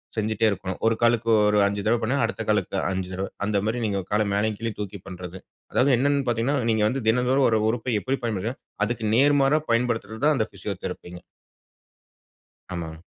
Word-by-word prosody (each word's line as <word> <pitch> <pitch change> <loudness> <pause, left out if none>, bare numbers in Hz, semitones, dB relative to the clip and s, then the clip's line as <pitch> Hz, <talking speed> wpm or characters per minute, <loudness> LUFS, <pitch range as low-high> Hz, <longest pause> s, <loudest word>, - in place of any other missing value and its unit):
செஞ்சுட்டே 110 0 +1
இருக்கணும். 95 -1 -4
ஒரு 115 0 +3
காலுக்கு 115 -1 +2 0.2
ஒரு 105 0 +3
5 100 0 -2
தடவ 115 +1 +3
பண்ணா, 125 +6 0
அடுத்த 115 0 -2
காலுக்கு 105 -2 0
5 95 -1 -2
தடவ. 95 +1 -2 0.2
அந்தமாரி 105 +3 0
நீங்க 100 -2 -1
கால 105 +1 +2
மேலயும், 105 +1 0
கீழயும் 115 -2 -4
தூக்கி 100 -1 -5
பண்றது. 90 0 -8 0.3
அதாவது 135 +1 +3
என்னன்னு 140 +1 +2
பார்த்தீங்கன்னா, 120 +4 +1
நீங்க 110 -1 +2
வந்து 125 0 -2
தினந்தோறும் 125 +3 +3
ஒரு 110 -1 +2
உறுப்பை 120 +1 -2
எப்பிடி 135 +3 -2
பயன்படுத்துனீங்கன்னா, 115 +2 -3 0.2
அதுக்கு 115 -1 -3
நேர்மாறா 145 +3 +4
பயன்படுத்துறது 115 -1 -1
தான், 150 -1 +4
அந்த 110 -1 0
பிசியோதெரபிங்க. 90 -2 -6 1.5
ஆமாங்க. 80 -1 -6
110 Hz, 165 wpm, -24 LUFS, 100-120 Hz, 1.5 s, நேர்மாறா